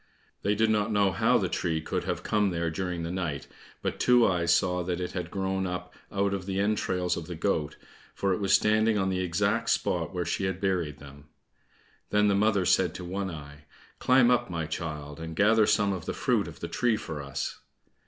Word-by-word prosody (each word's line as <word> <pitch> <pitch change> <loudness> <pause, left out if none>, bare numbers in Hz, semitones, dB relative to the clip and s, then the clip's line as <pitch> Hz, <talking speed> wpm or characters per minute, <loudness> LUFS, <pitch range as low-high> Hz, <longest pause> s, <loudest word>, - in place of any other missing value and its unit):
They 105 +1 +1
did 110 +1 +2
not 105 0 +1
know 100 -2 +3
how - - +3
the - - 0
tree 80 -2 -1
could 80 - -3
have - - -3
come 105 -2 +2
there 85 -2 -1
during 90 0 -3
the 85 - -3
night, 85 -7 -3 0.4
but - - -2
Two 125 -1 +5
eyes 85 -3 +2
saw 90 +1 +2
that 90 0 -2
it 90 - -3
had 90 -2 -4
grown 95 -1 -1
up 90 0 -5 0.2
out 100 0 0
of 95 -1 -4
the 95 0 -1
entrails 95 -4 0
of 80 -1 -6
the 90 - -5
goat, 80 -4 -1 0.4
for 100 -1 +1
it - - -2
was 100 -1 0
standing 110 +1 +4
on 95 -1 +1
the 95 -1 -1
exact 95 +3 0
spot - - 0
where 90 -2 -2
she 95 +3 -1
had 95 -1 -2
buried 90 -7 -1
them. 70 0 -13 0.8
Then 105 0 +3
the - - +3
mother 100 -1 +2
said 90 +1 +2
to 90 - -6
One 95 +2 -3
eye, 75 -2 -10 0.3
"Climb 125 -1 +5
up, 125 - +2
my 85 -2 -2
child, 75 -2 -5
and 80 0 -6
gather 110 +2 +4
some 100 -1 +2
of 90 -3 -6
the - - -1
fruit - - +1
of - - -11
the - - -3
tree 120 -3 +1
for 80 -8 -6
us." 70 0 -4
95 Hz, 215 wpm, -28 LUFS, 85-100 Hz, 0.8 s, Two